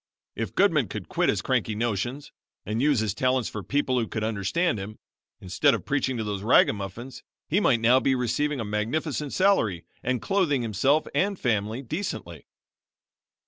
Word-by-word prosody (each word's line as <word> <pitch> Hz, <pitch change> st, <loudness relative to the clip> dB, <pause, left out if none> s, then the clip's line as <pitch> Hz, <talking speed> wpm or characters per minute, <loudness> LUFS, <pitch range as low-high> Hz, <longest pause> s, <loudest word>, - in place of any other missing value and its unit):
If -, -, -4 dB
Goodman -, -, +3 dB
would -, -, -6 dB
quit -, -, +1 dB
his -, -, 0 dB
cranky 110 Hz, -, 0 dB
notions 120 Hz, +5 st, -2 dB, 0.3 s
and 110 Hz, +4 st, -2 dB
use 140 Hz, -5 st, +3 dB
his 105 Hz, -3 st, -1 dB
talents 130 Hz, +1 st, +1 dB
for 105 Hz, -, -6 dB
people 130 Hz, +5 st, 0 dB
who 115 Hz, -, -1 dB
could 110 Hz, -, -4 dB
understand 110 Hz, -, 0 dB
him, 105 Hz, +3 st, -7 dB, 0.4 s
instead 115 Hz, +8 st, +2 dB
of 105 Hz, -, -7 dB
preaching 135 Hz, -3 st, 0 dB
to 110 Hz, -, -2 dB
those 105 Hz, -2 st, -3 dB
ragamuffins 105 Hz, +2 st, +1 dB, 0.3 s
he 180 Hz, -, +2 dB
might 120 Hz, -, +2 dB
now 120 Hz, +3 st, +5 dB
be 135 Hz, 0 st, +1 dB
receiving 140 Hz, +4 st, -1 dB
a 115 Hz, -, -3 dB
magnificent 130 Hz, +8 st, -2 dB
salary 110 Hz, -, +2 dB, 0.2 s
and 125 Hz, 0 st, -1 dB
clothing 145 Hz, -, +1 dB
himself 130 Hz, +8 st, +2 dB
and 200 Hz, 0 st, 0 dB
family 110 Hz, +1 st, -1 dB
decently." 110 Hz, -, -5 dB
120 Hz, 165 wpm, -26 LUFS, 105-145 Hz, 0.4 s, now